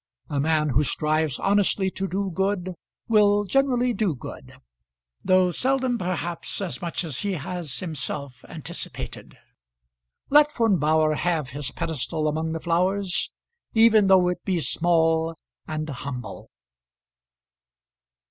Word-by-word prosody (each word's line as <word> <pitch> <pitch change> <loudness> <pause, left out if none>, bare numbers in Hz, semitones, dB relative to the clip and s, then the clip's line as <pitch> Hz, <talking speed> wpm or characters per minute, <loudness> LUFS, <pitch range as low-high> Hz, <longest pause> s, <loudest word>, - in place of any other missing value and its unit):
A 145 - 0
man 155 +1 +2
who 140 +3 +2
strives 155 0 0
honestly 195 -1 +2
to 195 +1 -3
do 195 +1 -2
good 190 0 -1 0.3
will 205 -2 +4
generally 250 +2 +2
do 205 -9 0
good, 120 - -10 0.7
though 185 -1 +4
seldom 255 - 0
perhaps 175 -2 -3
as 195 -2 -4
much 175 +1 -2
as 155 -6 -3
he 205 -1 -1
has 175 -2 -5
himself 140 -5 -5
anticipated. - - -7 0.9
Let 295 +1 +6
Von 225 -7 +2
Bauhr 155 +1 +3
have 165 -6 0
his 140 0 -4
pedestal 155 +1 -2
among 160 +1 -1
the 165 - -3
flowers, 180 +3 0 0.5
even 220 -2 +6
though 190 -2 +5
it 180 0 -4
be 185 -3 0
small 165 0 +2 0.3
and 155 0 -3
humble! 130 -3 -6
175 Hz, 125 wpm, -25 LUFS, 155-200 Hz, 0.9 s, Let